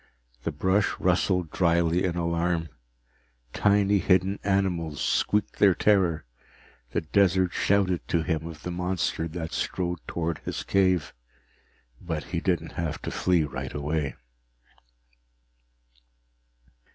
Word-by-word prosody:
The 80 Hz, -, -2 dB
brush 95 Hz, +7 st, +1 dB
rustled 90 Hz, -4 st, +1 dB
dryly 85 Hz, 0 st, +2 dB
in 90 Hz, -2 st, -1 dB
alarm, 85 Hz, -1 st, 0 dB, 0.8 s
tiny 100 Hz, 0 st, +3 dB
hidden 95 Hz, +2 st, +2 dB
animals 90 Hz, -6 st, 0 dB
squeaked 105 Hz, 0 st, 0 dB
their 95 Hz, -3 st, +6 dB
terror, 90 Hz, -, +2 dB, 0.6 s
the -, -, -1 dB
desert 95 Hz, +2 st, +2 dB
shouted 95 Hz, -3 st, +1 dB
to 85 Hz, -2 st, +1 dB
him 80 Hz, -2 st, -2 dB
of 80 Hz, -2 st, -10 dB
the 90 Hz, -, -4 dB
monster 90 Hz, -2 st, -1 dB
that 80 Hz, 0 st, -5 dB
strode 90 Hz, -2 st, -2 dB
toward 85 Hz, -2 st, -2 dB
his -, -, -5 dB
cave. 95 Hz, -5 st, +1 dB, 0.9 s
But 80 Hz, -4 st, -3 dB
he 85 Hz, 0 st, -3 dB
didn't 90 Hz, -1 st, -1 dB
have 80 Hz, -2 st, -3 dB
to -, -, -3 dB
flee 90 Hz, -3 st, +2 dB
right 65 Hz, 0 st, -5 dB
away. 75 Hz, 0 st, -2 dB
85 Hz, 115 wpm, -26 LUFS, 80-95 Hz, 0.9 s, their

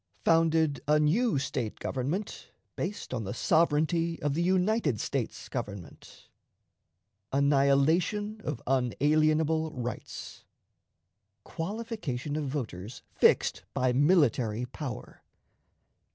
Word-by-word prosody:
Founded 160 Hz, -3 st, +3 dB
a 150 Hz, 0 st, +4 dB
New 195 Hz, -, +2 dB
State 125 Hz, -5 st, -3 dB
Government 150 Hz, +11 st, -4 dB, 0.3 s
based 190 Hz, -5 st, -4 dB
on 120 Hz, -3 st, -2 dB
the 100 Hz, -, -5 dB
Sovereignty 165 Hz, +1 st, +2 dB
of 145 Hz, -1 st, +1 dB
the 165 Hz, -, 0 dB
United 185 Hz, -, +1 dB
States -, -, -3 dB
Government. 100 Hz, -4 st, -8 dB, 1.0 s
Annihilation 150 Hz, +10 st, +2 dB
of 145 Hz, -6 st, -4 dB
Unalienable 155 Hz, +5 st, +2 dB
Rights. 125 Hz, -3 st, -6 dB, 1.0 s
Qualification 170 Hz, -, -4 dB
of 155 Hz, -1 st, -2 dB
Voters 115 Hz, -6 st, -5 dB
fixed -, -, +3 dB
by 125 Hz, -1 st, +2 dB
Military 125 Hz, -, +3 dB
Power. 130 Hz, 0 st, -7 dB
150 Hz, 95 wpm, -29 LUFS, 130-170 Hz, 1.0 s, a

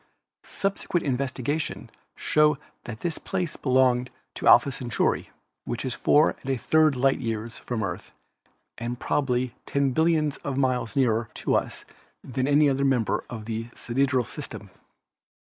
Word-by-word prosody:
Subsequent 195 Hz, -3 st, -2 dB
investigation 140 Hz, +2 st, -2 dB, 0.3 s
showed 150 Hz, -1 st, +3 dB, 0.3 s
that 110 Hz, -2 st, -7 dB
this 170 Hz, -2 st, -2 dB
place 180 Hz, -4 st, -3 dB
belonged 125 Hz, -2 st, +2 dB, 0.2 s
to -, -, -3 dB
Alpha 140 Hz, -, +7 dB
Centauri, 120 Hz, -3 st, -1 dB, 0.3 s
which 120 Hz, +2 st, -4 dB
is 130 Hz, -, -1 dB
four 150 Hz, +2 st, +3 dB
and 135 Hz, -, -7 dB
a 135 Hz, -, +1 dB
third 155 Hz, +3 st, +3 dB
light 135 Hz, +2 st, +2 dB
years 115 Hz, -1 st, -4 dB
from 120 Hz, -3 st, -3 dB
the -, -, 0 dB
Earth 90 Hz, -, -6 dB, 0.7 s
and 120 Hz, +1 st, -4 dB
prob 140 Hz, -2 st, 0 dB
ably 125 Hz, -1 st, 0 dB
ten 140 Hz, -1 st, +1 dB
billions 155 Hz, -1 st, +2 dB
of 135 Hz, -2 st, -4 dB
miles 130 Hz, -2 st, 0 dB
nearer 115 Hz, -4 st, +2 dB
to -, -, -1 dB
us -, -, -1 dB, 0.4 s
than 130 Hz, +1 st, -2 dB
any 145 Hz, +1 st, +5 dB
other 135 Hz, 0 st, +1 dB
member 130 Hz, -5 st, +1 dB
of 110 Hz, -3 st, -7 dB
the 115 Hz, 0 st, -4 dB
sidereal 130 Hz, 0 st, 0 dB
system. -, -, -8 dB
130 Hz, 150 wpm, -26 LUFS, 120-145 Hz, 0.7 s, Alpha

